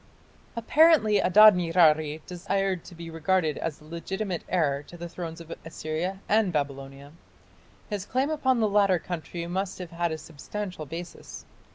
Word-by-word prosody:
Apparently 235 -3 +4
Adad 215 +3 +8
nirari 160 -3 +3
desired 185 0 -2
to 175 - -12
be 165 0 -8
regarded 165 -1 0
as 165 -3 -3
the 150 - -18
legitimate 180 +3 -4
heir 145 -6 +1
to 175 +4 -13
the 175 0 -6
thrones 170 -1 -7
of 165 -1 -8
Assyria 165 +4 -4
and 210 -3 +3
Babylonia. 140 -2 -4 0.8
His 205 -3 -3
claim 265 +5 0
upon 260 -5 +1
the 220 - +3
latter 200 -2 +3
country 170 0 -6
must 190 +2 -3
have 180 -3 -8
had 170 0 -1
a 160 - -3
substantial 160 +2 -7
basis. 170 +4 -8
175 Hz, 155 wpm, -27 LUFS, 160-200 Hz, 0.8 s, Adad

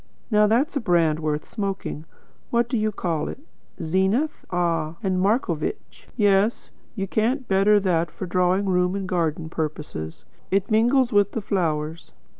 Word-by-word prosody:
Now 210 0 +5
that's 255 +9 +1
a - - +2
brand 170 - +2
worth 150 -1 -2
smoking. 195 -7 -4 0.4
What 235 0 +2
do 245 - -2
you 215 -1 +1
call 170 -6 -2
it - - -6 0.4
'Zenith'? 190 - 0
Ah, 165 -3 0
and 185 -2 +1
'Marcovitch.' 200 - -1
Yes; 205 +1 +2 0.2
you 195 -3 -2
can't 240 +7 0
better 200 +2 +4
that 170 -4 +1
for 165 +4 -6
drawing 180 +2 +1
room 180 0 +1
and 195 -1 -3
garden 165 -3 -1
purposes. 150 - -5 0.2
It 195 +2 0
mingles 240 +3 +3
with 205 -1 +3
the 225 - -2
flowers. 160 -5 -2
190 Hz, 150 wpm, -24 LUFS, 165-215 Hz, 0.4 s, Now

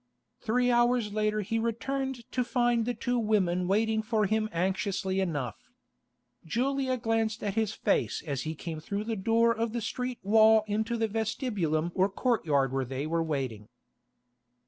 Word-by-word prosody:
Three 245 +2 +1
hours 240 -3 +2
later 215 0 +1
he 225 +3 -1
returned 265 +3 -2
to 250 - 0
find 240 -2 +1
the 245 0 -1
two 245 0 -1
women 185 -5 +1
waiting 220 +3 +2
for 215 -1 +1
him 215 +2 0
anxiously 190 +2 -1
enough. 145 - -3 0.7
Julia 260 - 0
glanced 225 -1 -1
at 205 -2 -1
his 220 -1 0
face - - 0
as 140 -4 -2
he 160 0 -4
came 160 0 -6
through 200 +6 -3
the 225 +1 -2
door 230 +3 +2
of 225 0 -2
the 240 - -1
street 250 +3 -3
wall 220 +1 +6
into 220 +3 -1
the 225 -1 +1
vestibulum 210 - -1
or 190 +1 +2
courtyard 155 - +1
where 135 0 0
they 135 +3 -4
were 165 +1 0
waiting. 130 -9 -3
215 Hz, 160 wpm, -29 LUFS, 180-235 Hz, 0.7 s, wall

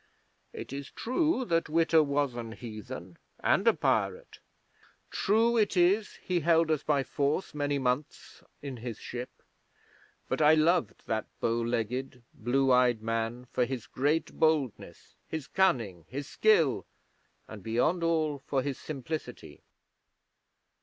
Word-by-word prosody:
It - - -8
is 140 0 -6
true 260 +2 0
that 165 -6 0
Witta 165 0 +4
was 140 -2 0
an 115 -2 -6
heathen 105 -7 -8 0.2
and - - +2
a - - +7
pirate; - - -1 0.7
true 225 +3 +2
it 210 -3 +2
is 195 +5 +3
he 180 -1 0
held 165 0 +3
us 155 -3 +1
by 145 -3 +1
force 145 +7 -1
many 145 -1 0
months 130 +2 -3 0.2
in 135 -3 -5
his 115 -1 -6
ship, 125 +1 -6 1.0
but - - -1
I 155 +1 +7
loved 165 +2 +2
that 110 -1 -2
bow 115 0 0
legged, 120 +2 -2
blue 130 +4 +1
eyed 125 -3 +3
man 115 +2 -2
for 125 - +1
his 125 -2 -4
great 145 +5 0
boldness, 155 -7 0
his 160 -4 -4
cunning, 115 - +1
his 140 +2 -5
skill, 165 - +3 0.6
and, 110 -2 -9
beyond 120 - +1
all, 155 -3 +1
for 135 0 -1
his 140 -2 -3
simplicity.' 155 +1 -6
140 Hz, 135 wpm, -29 LUFS, 120-160 Hz, 1.0 s, a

